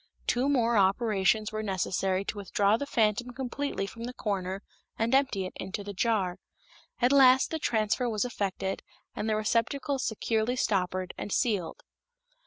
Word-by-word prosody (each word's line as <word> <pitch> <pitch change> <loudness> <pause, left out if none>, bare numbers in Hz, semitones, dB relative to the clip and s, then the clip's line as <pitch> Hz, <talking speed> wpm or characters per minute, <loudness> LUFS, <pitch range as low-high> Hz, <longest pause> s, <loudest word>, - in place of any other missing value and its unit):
Two 255 +3 +1
more 235 -4 +3
operations 205 +1 +2
were 215 0 -3
necessary 190 -1 -1
to 210 - -4
withdraw 200 +1 +2
the 280 +5 -3
phantom 220 0 +1
completely 265 -4 -3
from 230 +3 -7
the 250 +1 -6
corner 195 -3 -3 0.3
and 225 +3 0
empty 260 -8 +2
it 185 - -7
into 200 +2 -5
the 205 0 -6
jar. 195 -4 0 0.6
At 245 +1 +3
last 265 -1 +6
the 320 - -2
transfer 230 -1 +1
was 215 0 0
effected 195 -5 -3 0.3
and 220 - -2
the 215 - +2
receptacle 235 +6 0
securely 225 0 0
stoppered 185 -5 0
and 205 - -5
sealed. 200 -8 0
215 Hz, 155 wpm, -29 LUFS, 195-245 Hz, 0.6 s, last